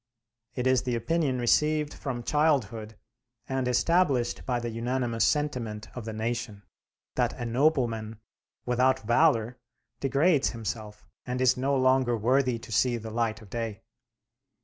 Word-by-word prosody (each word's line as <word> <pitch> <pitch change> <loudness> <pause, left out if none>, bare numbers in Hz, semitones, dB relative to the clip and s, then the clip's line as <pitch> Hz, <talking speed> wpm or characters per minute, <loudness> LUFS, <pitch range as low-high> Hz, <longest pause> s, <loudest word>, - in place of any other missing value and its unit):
It 125 -2 -2
is 130 -1 +3
the 125 -2 -2
opinion 135 +3 0
received 150 +5 +2
from 120 -3 -5
childhood 115 -8 0 0.5
and 130 -1 -1
established 130 -2 +2
by 125 -2 0
the 120 -1 -4
unanimous 120 0 -1
sentiment 115 -8 -2
of 125 -3 -6
the 110 - -4
nation, 110 -2 -4 0.5
that - - 0
a 120 - -4
nobleman 115 -4 0 0.5
without 130 +2 +2
valor 120 -1 +2 0.4
degrades 140 +3 +2
himself 110 -1 -6 0.2
and 125 0 -2
is 130 -1 +4
no 135 +2 0
longer 130 -2 +3
worthy 125 +2 +2
to 115 - -12
see 120 +2 +2
the 110 -1 -7
light 110 -1 -1
of 100 - -17
day. 115 -3 -4
120 Hz, 140 wpm, -28 LUFS, 115-135 Hz, 0.5 s, is